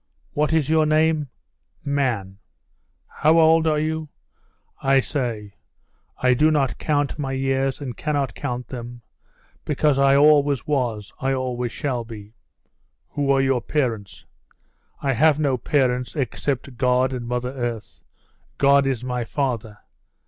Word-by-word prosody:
'What 150 +1 0
is 160 -4 +2
your 155 0 +3
name?' 155 -1 +2 0.6
'Man.' 120 -9 -1 0.7
'How 155 +2 +2
old 160 0 +5
are 155 -1 +2
you?' 155 0 -2 0.7
I 135 0 +4
say, 120 -8 -3 0.7
'I 125 0 +5
do 155 +5 +3
not 135 -7 0
count 145 -1 -1
my 135 -2 -2
years 135 0 0
and 130 -5 -6
cannot 145 -3 -2
count 125 -4 -5
them, 120 -1 -8 0.6
because 150 -1 +1
I 140 0 +5
always 145 -2 +4
was, 120 -8 -2
I 135 0 0
always 125 -2 -3
shall 130 -4 -3
be.' 110 -2 -11 0.8
'Who 145 -1 -2
are 135 -1 +4
your 135 -2 +1
parents?' 115 -10 -3 0.8
'I 135 -1 +1
have 150 +4 +3
no 140 -4 +1
parents 125 0 0
except 135 -2 -3
God 125 0 +2
and 120 -2 -5
Mother 125 +1 -2
Earth. 120 -4 -5 0.6
God 140 0 +4
is 130 -3 -2
my 125 -1 -2
father. 115 -5 -3
135 Hz, 135 wpm, -22 LUFS, 125-145 Hz, 0.8 s, old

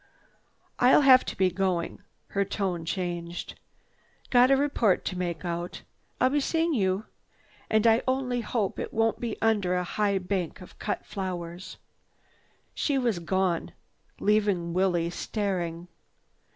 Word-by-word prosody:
"I—I'll 250 +4 +6
have 260 -2 +7
to - - -5
be 185 -1 +3
going." 180 -2 -1 0.3
Her 200 - +1
tone 190 -4 -2
changed. 175 -1 -4 0.7
"Got 250 0 +6
a 275 - +5
report 260 -9 +2
to 185 - -2
make 175 -2 -3
out. 175 0 -4 0.4
I'll 255 - +3
be 290 - +2
seeing 325 +3 +1
you. 195 -3 0 0.6
And 220 0 +2
I 225 +1 +5
only 260 -2 0
hope 215 -3 -2
it - - -4
won't 225 0 +2
be 235 -3 -4
under 205 -5 +2
a 180 - 0
high 200 +2 0
bank 185 -2 -3
of 180 - -14
cut 210 - -3
flowers." 180 -2 -5 1.0
She 285 -2 0
was 235 -8 0
gone, 180 0 -1 0.5
leaving 200 -5 +1
Willie 175 -2 +1
staring. 175 -4 -3
195 Hz, 140 wpm, -27 LUFS, 175-225 Hz, 1.0 s, have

